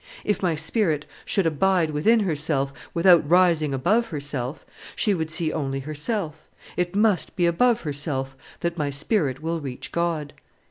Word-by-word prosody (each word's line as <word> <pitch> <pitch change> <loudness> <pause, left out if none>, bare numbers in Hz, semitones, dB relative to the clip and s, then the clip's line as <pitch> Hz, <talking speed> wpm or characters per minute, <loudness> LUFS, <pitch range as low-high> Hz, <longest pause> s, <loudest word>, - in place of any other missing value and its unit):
If 210 - 0
my 175 -4 +1
spirit 160 -1 0 0.2
should 195 - +1
abide 165 +1 +2
within 215 +10 +3
herself 150 -6 -1 0.2
without 170 -3 +5
rising 170 -4 +4
above 210 - +2
herself, 140 -3 -4 0.3
she 210 - +1
would 160 -4 -2
see 160 0 -2
only 135 -3 -2
herself; 155 - -4 0.3
it 180 +1 -1
must 210 -3 +2
be 180 -3 +2
above 230 +8 +3
herself 140 -3 -3 0.3
that 170 -1 -2
my 145 -1 0
spirit 140 - -1
will 165 0 -2
reach 130 -3 -7
God." 165 -4 -1
160 Hz, 150 wpm, -24 LUFS, 145-180 Hz, 0.3 s, without